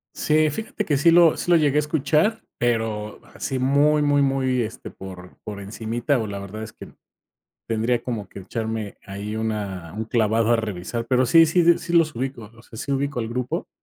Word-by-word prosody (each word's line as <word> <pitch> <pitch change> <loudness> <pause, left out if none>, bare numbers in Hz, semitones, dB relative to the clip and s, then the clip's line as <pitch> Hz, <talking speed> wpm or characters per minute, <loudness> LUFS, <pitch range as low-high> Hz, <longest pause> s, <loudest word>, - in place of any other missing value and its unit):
Sí, 155 0 +2
fíjate 210 +5 -4
que 145 -7 +1
sí 165 +4 +5
lo 170 -2 +6
sí - - -2
lo 175 - +7
llegué 150 -3 +2
a - - +6
escuchar, 155 - +1 0.2
pero 110 -3 -1
así, 135 - -3
muy 145 +3 +3
muy 145 -1 +3
muy, 135 -2 +1
este, 115 +1 -5
por 90 -1 -11
por 105 -1 -7
encimita, 115 +6 -2
o 110 - -2
la 100 -1 -5
verdad 100 +2 -7
es 110 - -8
que - - -12 0.7
tendría 115 +2 0
como 110 -6 -4
que - - -10
echarme 110 0 -4
ahí 100 +2 -5
una 100 -6 -4
un 110 - -2
clavado 115 0 +1
a 120 - +4
revisar, 110 +2 -4
pero 130 0 +3
sí 165 +6 +7
sí 170 +1 +4
sí 170 0 -5
los 165 -2 +4
ubico. 125 -4 -5
O 115 - -15
sea, 110 - -13
sí 140 - -4
ubico 140 -1 -1
el 115 - -4
grupo, 125 +1 -3
120 Hz, 200 wpm, -23 LUFS, 110-145 Hz, 0.7 s, lo